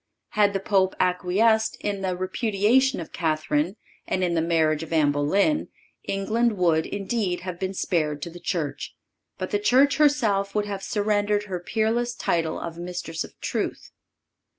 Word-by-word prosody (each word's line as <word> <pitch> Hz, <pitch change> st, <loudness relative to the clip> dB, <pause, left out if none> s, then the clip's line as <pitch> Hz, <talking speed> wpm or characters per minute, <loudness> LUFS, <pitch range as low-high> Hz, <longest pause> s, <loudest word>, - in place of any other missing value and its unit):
Had 205 Hz, -2 st, +2 dB
the 195 Hz, -, 0 dB
Pope 190 Hz, -1 st, +1 dB
acquiesced 205 Hz, +5 st, +2 dB
in 200 Hz, -1 st, -3 dB
the 185 Hz, -2 st, -1 dB
repudiation 215 Hz, +7 st, +2 dB
of 165 Hz, -, -7 dB
Catherine, 155 Hz, +2 st, 0 dB, 0.3 s
and 185 Hz, -, 0 dB
in 175 Hz, -1 st, +1 dB
the 165 Hz, -, +2 dB
marriage 160 Hz, -2 st, +2 dB
of 165 Hz, -, -8 dB
Anne 155 Hz, -3 st, +3 dB
Boleyn, 195 Hz, -, +1 dB, 0.4 s
England 215 Hz, +3 st, 0 dB
would, 165 Hz, -3 st, +2 dB
indeed, 200 Hz, -2 st, -2 dB
have 180 Hz, -1 st, -6 dB
been 190 Hz, 0 st, -3 dB
spared 155 Hz, -5 st, 0 dB
to 170 Hz, -, -5 dB
the 175 Hz, -, -10 dB
Church, 150 Hz, -5 st, -3 dB, 0.4 s
but 185 Hz, -, -4 dB
the 205 Hz, -, +1 dB
Church 260 Hz, +7 st, +4 dB
herself 220 Hz, -10 st, +2 dB
would 210 Hz, -1 st, +1 dB
have 200 Hz, -2 st, -4 dB
surrendered 205 Hz, 0 st, 0 dB
her 190 Hz, -4 st, -4 dB
peerless 225 Hz, +5 st, 0 dB
title 165 Hz, -2 st, -1 dB
of 170 Hz, 0 st, -6 dB
Mistress 175 Hz, -2 st, -4 dB
of -, -, -14 dB
Truth. -, -, -3 dB
190 Hz, 160 wpm, -25 LUFS, 170-210 Hz, 0.4 s, Church